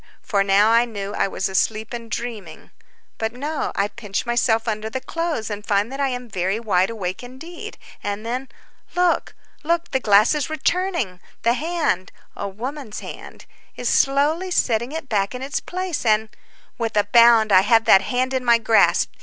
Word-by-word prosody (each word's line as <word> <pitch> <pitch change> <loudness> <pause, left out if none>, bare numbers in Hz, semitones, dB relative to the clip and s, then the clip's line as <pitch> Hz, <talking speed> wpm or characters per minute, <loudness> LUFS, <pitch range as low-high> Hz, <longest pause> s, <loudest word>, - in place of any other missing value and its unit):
For 200 -2 +1
now 200 +3 +4
I 235 +1 +5
knew 205 -3 -6
I - - +1
was 190 - -2
asleep 215 +4 -1
and 235 -1 -6
dreaming. 220 -8 -6 0.5
But 225 0 -2
no, 290 +5 -3
I 200 - +1
pinch 205 -1 -4
myself 235 -1 +1
under 215 0 -2
the 260 - -3
clothes, 305 -5 -3
and 205 0 -5
find 205 +3 0
that 270 - -6
I 280 - +2
am 250 -1 -4
very 195 0 -1
wide 195 -5 +1
awake 190 -5 -4
indeed; 265 +8 -9 0.2
and 205 +2 -4
then—look! 270 +8 -3 0.3
look! 340 +2 0
the 265 - +1
glass 210 0 +5
is 300 -1 -2
returning; 315 - -1 0.2
the 235 - +4
hand—a 300 - -3
woman's 245 +4 -6
hand—is - - -8
slowly 295 +7 +2
setting 235 -7 +1
it 320 -2 -5
back 205 -1 0
in 250 - -6
its 285 +3 -2
place, 365 -2 -4
and— 220 -1 +2 0.5
With 225 -2 -2
a 205 - +5
bound 230 0 +5
I 185 -1 +7
have 225 +3 +3
that 190 - +7
hand 255 +5 -1
in 260 -1 -1
my 235 -1 +5
grasp. 225 -1 +3
230 Hz, 170 wpm, -22 LUFS, 205-270 Hz, 0.5 s, I